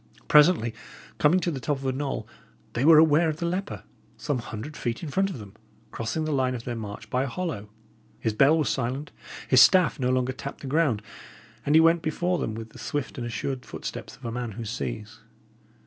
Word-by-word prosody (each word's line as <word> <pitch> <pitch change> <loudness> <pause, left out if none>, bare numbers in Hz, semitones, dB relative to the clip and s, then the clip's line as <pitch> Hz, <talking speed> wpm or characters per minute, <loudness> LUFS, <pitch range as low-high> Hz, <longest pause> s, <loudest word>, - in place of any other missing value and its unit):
Presently, 150 -7 +5 0.5
coming 160 +5 +4
to 175 - 0
the 140 - -4
top 145 +3 -1
of 135 - -9
a 130 - +1
knoll, 135 +1 -3 0.5
they 120 - -1
were 160 +1 +8
aware 160 +1 +5
of 155 - -3
the 170 - -3
leper, 185 +3 -3 0.3
some 145 -4 -2
hundred 115 +5 -7
feet 120 +5 -3
in 160 - -4
front 195 +6 +1
of 185 - -6
them, 100 -4 -11 0.4
crossing 115 +8 -3
the 155 - -2
line 130 -2 +1
of 115 - -6
their 120 -1 -4
march 110 0 -7
by 125 - +1
a 135 - -1
hollow. 135 - -4 0.5
His 110 - -1
bell 140 +8 +5
was 155 - +1
silent, 135 +3 -2 0.4
his 130 -1 +7
staff 185 -6 +5
no 125 -1 +1
longer 130 0 +1
tapped 140 +2 -8
the - - -8
ground, 135 -7 +1 0.6
and 145 - +4
he 160 - +8
went 165 +1 +4
before 175 +3 -1
him 110 - -3
with 110 0 -8
the - - -13
swift 145 -2 -4
and 120 - -3
assured 125 +2 -3
footsteps - - -7
of - - -14
a 115 - -3
man 120 -2 -4
who 115 +2 -6
sees. 105 - -5
135 Hz, 215 wpm, -26 LUFS, 115-155 Hz, 0.6 s, were